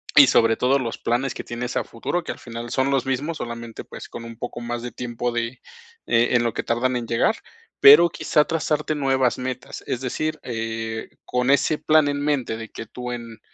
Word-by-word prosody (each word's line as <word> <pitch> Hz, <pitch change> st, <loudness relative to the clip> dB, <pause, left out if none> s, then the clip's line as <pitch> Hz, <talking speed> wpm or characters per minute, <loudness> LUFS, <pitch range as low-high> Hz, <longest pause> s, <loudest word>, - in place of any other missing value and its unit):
y, 140 Hz, -3 st, +10 dB
sobre 115 Hz, -2 st, +4 dB
todo, 130 Hz, +2 st, +3 dB
los 120 Hz, -3 st, -4 dB
planes 120 Hz, +3 st, 0 dB
que -, -, -6 dB
tienes 120 Hz, +1 st, -5 dB
a -, -, +1 dB
futuro, 170 Hz, +9 st, -3 dB
que -, -, -4 dB
al -, -, -7 dB
final 115 Hz, 0 st, -7 dB
son 130 Hz, +3 st, +1 dB
los 135 Hz, -2 st, +1 dB
mismos, 145 Hz, +5 st, -1 dB
solamente, 115 Hz, -1 st, -6 dB
pues, -, -, -10 dB
con 115 Hz, -, -8 dB
un 115 Hz, -1 st, -9 dB
poco 120 Hz, -1 st, -5 dB
más 120 Hz, 0 st, -4 dB
de 120 Hz, -, -5 dB
tiempo 120 Hz, +1 st, -3 dB
de, 120 Hz, +1 st, -3 dB, 0.5 s
eh, 115 Hz, +1 st, +4 dB
en 120 Hz, -, +4 dB
lo 115 Hz, -, 0 dB
que -, -, -2 dB
tardan 125 Hz, +2 st, 0 dB
en 115 Hz, -1 st, -5 dB
llegar, 115 Hz, -, +2 dB, 0.4 s
pero 150 Hz, +5 st, +9 dB
quizá 150 Hz, -1 st, +2 dB
trazarte 155 Hz, -1 st, -1 dB
nuevas 135 Hz, -3 st, +1 dB
metas. 125 Hz, -1 st, -5 dB
Es 125 Hz, -, -2 dB
decir, 155 Hz, +4 st, -2 dB
eh, 115 Hz, -1 st, -4 dB, 0.2 s
con 125 Hz, +1 st, 0 dB
ese 140 Hz, +2 st, +3 dB
plan 155 Hz, -1 st, +4 dB
en 145 Hz, 0 st, -2 dB
mente 140 Hz, -6 st, 0 dB
de 115 Hz, -1 st, -8 dB
que 115 Hz, -, -8 dB
tú 125 Hz, +2 st, -6 dB
en, 115 Hz, -2 st, -7 dB
125 Hz, 215 wpm, -23 LUFS, 115-140 Hz, 0.5 s, y